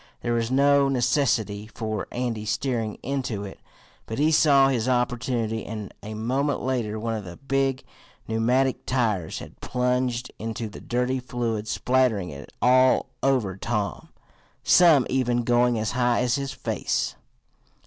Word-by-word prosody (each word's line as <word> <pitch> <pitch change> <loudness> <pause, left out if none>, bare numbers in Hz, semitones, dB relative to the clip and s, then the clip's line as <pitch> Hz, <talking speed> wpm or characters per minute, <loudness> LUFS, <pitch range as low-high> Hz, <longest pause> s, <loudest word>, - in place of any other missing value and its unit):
There 120 - -1
was 115 -1 0
no 140 +1 +4
necessity 115 -5 +1
for 110 -2 -4
Andy 120 -3 -2
steering 115 -1 -1
into 125 -6 -2
it, 100 - -9 0.5
but 110 - -4
he 150 +3 +3
saw 140 -3 +5
his 125 -2 0
opportunity, 120 -3 0
and 105 -2 -7
a 110 +1 -7
moment 130 +6 -1
later 120 -5 -1
one 115 +1 -2
of 110 -2 -4
the 90 -2 -9
big 135 -1 -1 0.4
pneumatic 125 +4 +1
tires 110 -10 0
had - - -11
plunged 125 -1 -1
into 110 0 -4
the 105 - -11
dirty 125 +2 -1
fluid, 115 -4 -3
spattering 120 -7 +1
it 70 0 -10
all 130 +1 +4
over 125 -9 +1
Tom, 105 0 -3 0.5
some 165 -7 +6
even 125 -2 +1
going 120 0 +3
as 110 0 -1
high 120 -1 +1
as 125 -1 +1
his 140 +1 -2
face. - - -2
120 Hz, 145 wpm, -25 LUFS, 110-130 Hz, 0.5 s, some